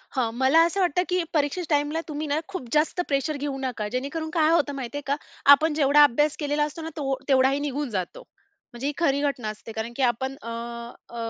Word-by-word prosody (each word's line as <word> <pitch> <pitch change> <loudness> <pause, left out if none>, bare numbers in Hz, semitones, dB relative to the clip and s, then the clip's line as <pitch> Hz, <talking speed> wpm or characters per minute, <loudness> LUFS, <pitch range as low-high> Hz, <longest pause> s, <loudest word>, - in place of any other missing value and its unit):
हां. 240 -4 +1
मला 265 +6 +4
असं 340 +4 -2
वाटतं 360 -1 +2
की 360 -1 +1
परीक्षेच्या 310 +2 +1
टाईमला 295 +3 0
तुम्ही 305 0 -4
ना 290 +1 +1
खूप 370 -10 -6
जास्त 310 +4 +2
प्रेशर 285 +2 0
घेऊ 285 -1 -3
नका. 250 -5 -3
जेणेकरून 280 +6 -3
काय 320 -2 +3
होतं 300 -4 +2
माहिती 270 +1 -5
आहे - - -4
का 280 - +2 0.4
आपण 305 +3 +6
जेवढा 295 0 +5
अभ्यास 295 +2 +3
केलेला 295 0 0
असतो 300 +2 -4
ना 320 - -5
तो 275 -3 -1
तेवढाही 270 0 +3
निघून 285 -1 -3
जातो. 185 -5 -4 0.5
म्हणजे 240 +3 -4
ही 295 - -1
खरी 285 -5 +2
घटना 275 -6 -1
असते, 215 +1 -8
कारण 220 +2 -5
की 275 - -3
आपण 260 +2 0
अ, 230 - -10 0.6
अ, - - -12
285 Hz, 215 wpm, -25 LUFS, 265-310 Hz, 0.6 s, आपण